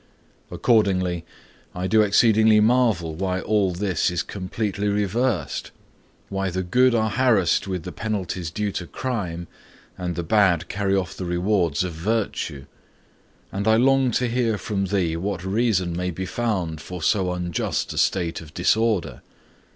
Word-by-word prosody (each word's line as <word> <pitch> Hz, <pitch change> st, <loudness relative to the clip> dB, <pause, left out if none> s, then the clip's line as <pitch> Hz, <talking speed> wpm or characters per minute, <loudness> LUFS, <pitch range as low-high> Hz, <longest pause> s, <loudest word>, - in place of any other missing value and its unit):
Accordingly, 90 Hz, -7 st, +1 dB, 0.5 s
I 90 Hz, +1 st, -3 dB
do 110 Hz, +3 st, +4 dB
exceedingly 110 Hz, +1 st, +5 dB
marvel 110 Hz, -8 st, +2 dB
why 90 Hz, +2 st, -2 dB
all 100 Hz, -1 st, +1 dB
this 90 Hz, +1 st, 0 dB
is 90 Hz, -1 st, -1 dB
completely 100 Hz, +1 st, -3 dB
reversed 105 Hz, +2 st, -1 dB, 0.6 s
why 95 Hz, -1 st, -2 dB
the 95 Hz, +1 st, -2 dB
good 125 Hz, +7 st, +3 dB
are 110 Hz, -1 st, +1 dB
harassed 110 Hz, -, +2 dB
with 90 Hz, -3 st, -3 dB
the -, -, -6 dB
penalties 95 Hz, -6 st, -3 dB
due 105 Hz, +4 st, -2 dB
to 90 Hz, -2 st, -5 dB
crime, 90 Hz, -10 st, -4 dB, 0.5 s
and 90 Hz, -1 st, -3 dB
the 85 Hz, -, -3 dB
bad 90 Hz, -3 st, +3 dB
carry 100 Hz, 0 st, 0 dB
off 95 Hz, -3 st, -2 dB
the 90 Hz, -, -5 dB
rewards 90 Hz, -3 st, +1 dB
of 90 Hz, -2 st, -4 dB
virtue; 85 Hz, -6 st, -2 dB, 0.9 s
and 100 Hz, +2 st, -3 dB
I 110 Hz, -, +5 dB
long 135 Hz, +2 st, +4 dB
to 125 Hz, -, +1 dB
hear 115 Hz, -2 st, 0 dB
from 100 Hz, -1 st, -2 dB
thee 90 Hz, -4 st, 0 dB
what 95 Hz, 0 st, -3 dB
reason 95 Hz, -4 st, +1 dB
may 90 Hz, +1 st, -2 dB
be 95 Hz, +2 st, -4 dB
found 90 Hz, -7 st, -2 dB
for 90 Hz, -3 st, -7 dB
so 95 Hz, 0 st, +2 dB
unjust 90 Hz, -2 st, -2 dB
a -, -, -2 dB
state 85 Hz, -4 st, 0 dB
of 75 Hz, -2 st, -14 dB
disorder. 105 Hz, -, +1 dB
95 Hz, 150 wpm, -23 LUFS, 90-110 Hz, 0.9 s, exceedingly